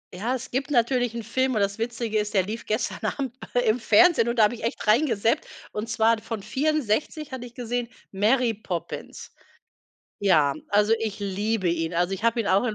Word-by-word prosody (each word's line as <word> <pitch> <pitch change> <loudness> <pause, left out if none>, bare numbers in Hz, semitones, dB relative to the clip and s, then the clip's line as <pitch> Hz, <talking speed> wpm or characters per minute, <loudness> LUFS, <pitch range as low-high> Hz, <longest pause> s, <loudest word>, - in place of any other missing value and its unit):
Ja, 235 +7 -1
es 260 +1 -7
gibt 270 +3 -2
natürlich 245 -2 +1
'n 230 - -4
Film 260 +2 0
und 210 - +1
das 200 +2 -1
Witzige 230 -2 -1
ist, 210 0 -3
der 190 - +4
lief 220 +4 -6
gestern 215 - -1
Abend 265 -4 -2 0.3
im 220 +3 +2
Fernsehen 330 -4 +5
und 235 - -2
da 220 - +6
habe 210 - +3
ich 230 - -9
echt 230 - -3
reingezappt, 225 -1 +2 0.2
und 215 +2 -4
zwar 225 0 +3
von 220 -2 -5
64 295 +2 -1
hatte 245 -1 -6
ich 240 - -18
gesehen 245 -1 -3 0.2
Mary 225 +4 +2
Poppins. 185 -5 -6 0.9
Ja, 155 -8 +4 0.2
also 210 +2 +3
ich 220 -2 -3
liebe 200 0 -1
ihn, 165 0 -2
also 175 +2 +1
ich 195 +4 -4
habe 230 0 +2
ihn 210 - -2
auch 195 +5 +3
in 220 -3 -1
225 Hz, 200 wpm, -25 LUFS, 205-245 Hz, 0.9 s, da